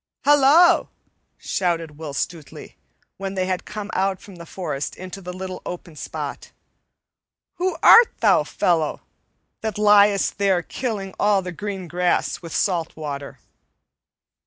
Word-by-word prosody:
"Halloa!" 295 +5 +5 0.5
shouted 165 -5 -2
Will 150 -3 -6
Stutely, 160 +1 -6 0.4
when 195 0 -5
they 185 -1 0
had 185 -1 -3
come 210 0 -6
out 190 0 0
from 195 -3 -14
the 170 0 -11
forest 150 -7 -4
into 185 +1 -9
the 180 -1 -7
little 185 0 -7
open 175 -2 -8
spot. - - -6 1.1
"Who 370 +1 -1
art 465 0 +8
thou, - - +4
fellow, 165 -4 0 0.6
that 220 -2 -3
liest 205 -1 +4
there 190 -3 +2
killing 205 -6 -4
all 205 -2 +3
the 180 - -5
green 195 0 -6
grass 175 +1 0
with 165 -2 -9
salt 170 -3 -1
water?" 140 -3 -6
185 Hz, 135 wpm, -22 LUFS, 170-205 Hz, 1.1 s, art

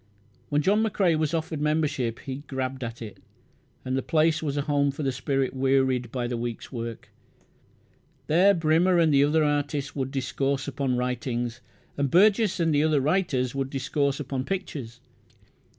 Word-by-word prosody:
When 145 0 +1
John 205 +6 +3
McCrae 195 -6 +2
was 155 0 0
offered 160 -2 -3
membership 150 -6 0
he 130 -2 -5
"grabbed 130 0 -3
at 115 0 -6
it", 105 -3 -10 0.7
and 130 0 -1
the 135 - 0
place 155 +2 +2
was 145 -2 -2
a 145 - 0
home 145 -1 +1
for 140 +2 -4
the 135 - +1
spirit 135 0 -1
wearied 130 -2 +1
by 125 -2 -2
the 120 0 -2
week's 120 -1 -5
work. 115 -2 -6 1.2
There 185 +6 +4
Brymner 165 +3 +3
and 160 -3 +4
the 140 0 +5
other 155 +2 +3
artists 145 -1 -1
would 135 -2 -2
discourse 135 0 -2
upon 130 -2 -1
writings, 125 -1 -2 0.4
and 140 -1 0
Burgess 205 - +4
and 165 -2 +2
the 145 +1 +3
other 155 -2 +3
writers 135 -5 0
would 135 -1 -2
discourse 140 +1 -1
upon 135 -2 -3
pictures. 140 - -5
140 Hz, 165 wpm, -26 LUFS, 130-155 Hz, 1.2 s, the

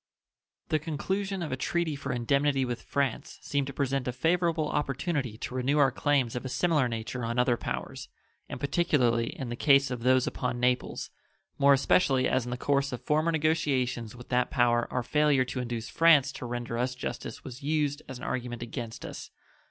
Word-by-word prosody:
The 155 - +2
conclusion 190 +5 -2
of 155 - -4
a - - 0
treaty 160 +3 -1
for 140 -1 -4
indemnity 135 +3 +1
with 120 -1 -4
France 140 -4 -2
seemed 140 -2 -1
to - - -4
present 135 -1 -1
a - - +1
favorable 165 +3 +1
opportunity 140 -5 -2
to 125 - -6
renew 130 +3 +1
our 140 -3 +5
claims 135 -3 +1
of 125 - -3
a 130 - -4
similar 155 -2 +2
nature 115 +1 -4
on 115 +1 -2
other 125 0 +3
powers, - - -5 0.4
and - - -6
particularly 130 -7 +2
in 130 -3 -5
the 120 - -3
case 140 +1 +4
of 125 -2 -4
those 130 +1 +4
upon 125 -1 -2
Naples, 125 0 0 0.5
more 140 0 +6
especially 135 -1 +3
as 130 - +1
in - - -5
the 125 - -3
course 140 +1 +1
of 125 - -6
former 155 +2 +2
negotiations 135 -8 0
with 125 0 -12
that 125 0 +1
power 120 -3 +2
our 125 - -1
failure 150 -1 +3
to 130 - -4
induce 120 -2 -4
France 150 -5 +5
to 135 -2 -7
render 120 -1 -3
us 125 +1 -1
justice 125 +3 -6
was 130 0 -9
used 145 0 0
as 130 - -6
an - - -11
argument 120 -1 -3
against 115 -1 -6
us. - - -8
130 Hz, 190 wpm, -28 LUFS, 125-145 Hz, 0.5 s, more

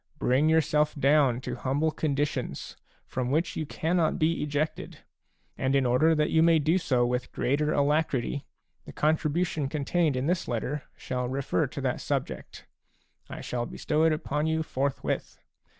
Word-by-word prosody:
Bring 135 +5 +2
yourself 150 -1 +2
down 140 -3 +3
to - - -4
humble 145 +4 0
conditions, 145 - -2 0.3
from 125 -1 -3
which 155 +5 0
you 155 - -3
cannot 160 +1 0
be 160 +1 +1
ejected; 150 +1 -2 0.6
and 130 +1 +1
in 135 -1 +3
order 155 +7 +4
that 150 0 +1
you 160 - +4
may 165 0 +5
do 160 +5 +2
so 125 -7 +2
with 125 0 -2
greater 145 +4 0
alacrity, 145 -2 +1 0.4
the - - -10
contribution 155 -1 0
contained 155 +1 0
in 130 +1 -1
this 175 +3 0
letter 130 +4 -3
shall 125 -1 -3
refer 130 -8 0
to - - -6
that - - -1
subject; - - -4 0.6
I - - -7
shall 120 -1 -3
bestow 155 0 0
it 165 - +4
upon 150 0 -1
you 160 0 0
forthwith. 140 -2 -2
150 Hz, 155 wpm, -28 LUFS, 130-160 Hz, 0.6 s, may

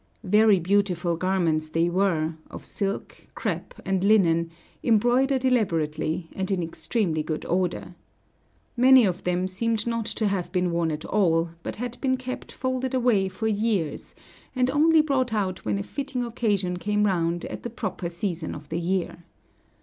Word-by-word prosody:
Very 210 0 +5
beautiful 180 -2 +1
garments 165 -3 0
they 165 +2 +1
were, 175 -3 +1 0.2
of - - -9
silk, 200 -1 -3
crêpe, - - -3
and 190 -1 0
linen, 170 -6 +4 0.3
embroidered 250 +4 +3
elaborately, 165 - 0
and 190 -1 -2
in 190 -3 0
extremely 165 0 -1
good 155 0 -4
order. 180 +1 -1 0.8
Many 255 0 +7
of 180 -3 -2
them 180 +1 0
seemed 220 +3 -1
not 230 -2 -2
to 220 - -1
have 195 -3 -1
been 180 -2 0
worn 170 -1 0
at 155 0 -4
all, 170 -5 +2
but - - -5
had 245 +2 -6
been 260 -1 +1
kept 255 0 -6
folded 260 0 -2
away 230 -7 +2
for 190 +4 -5
years, 205 -6 -1 0.4
and 255 0 +2
only 315 +3 +5
brought 260 -6 0
out 190 -3 -2
when 105 -2 0
a 100 - -3
fitting 270 - -4
occasion 205 -6 -1
came 210 +3 0
round 170 -3 0
at - - -6
the 240 - -5
proper 195 -6 -4
season 170 -2 -4
of 150 0 -11
the 170 - -2
year. 175 -1 -2
195 Hz, 160 wpm, -25 LUFS, 170-230 Hz, 0.8 s, Many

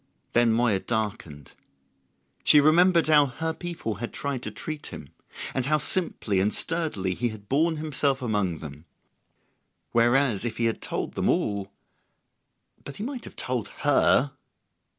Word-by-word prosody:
Then 120 -1 +4
Moya 110 -3 +2
darkened. 100 - -4 0.9
She 150 - +7
remembered 170 +3 +5
how 150 -2 +5
her 160 +5 -3
people 160 - -5
had 120 - -4
tried 140 -3 -3
to - - -4
treat 155 -2 -6
him, 70 - -9 0.4
and 130 -1 -1
how 155 +1 +3
simply 150 - 0
and 100 +3 +2
sturdily 150 - -1
he 120 +6 -1
had 105 -2 -11
borne 160 +6 +2
himself 145 -3 -1
among 105 - -1
them. 75 0 -9 1.1
Whereas, 120 -2 +3
if 115 -2 -3
he 115 - 0
had 115 - -1
told - - -4
them - - 0
all... 100 -1 0 1.1
but 140 - -8
he 205 - -5
might 255 0 -5
have - - -11
told 125 -5 -2 0.2
her! 145 -1 +4
125 Hz, 150 wpm, -26 LUFS, 105-155 Hz, 1.1 s, She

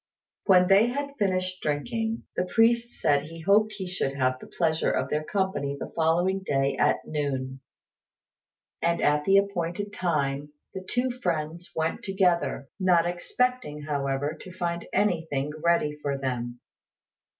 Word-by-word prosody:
When 180 -2 +6
they 200 +4 +6
had 280 +3 -3
finished 185 -2 0
drinking, 225 +10 -2
the 180 - 0
priest 235 +3 +2
said 145 -2 +2
he 165 +1 -9
hoped 210 +5 +3
he 195 -2 -5
should 180 -7 -2
have 130 -1 +1
the - - -11
pleasure 160 -2 +1
of - - -1
their 150 +1 0
company 170 -7 -1
the - - -6
following 175 +4 +2
day 135 -5 +1
at - - +2
noon; 135 -3 -3 1.2
and 170 0 +1
at 150 0 +2
the 195 0 +5
appointed 200 0 -1
time 145 -4 -1 0.2
the 190 -1 -6
two 245 +6 0
friends 170 -6 -3
went 160 +1 -1
together, 180 -7 +1
not 180 -3 +4
expecting, 175 -2 -1
however, 140 0 -1
to 185 - -10
find 170 -1 -3
anything 160 -8 0
ready 170 -3 +2
for 140 -1 -1
them. 120 -2 -3
170 Hz, 145 wpm, -27 LUFS, 145-195 Hz, 1.2 s, When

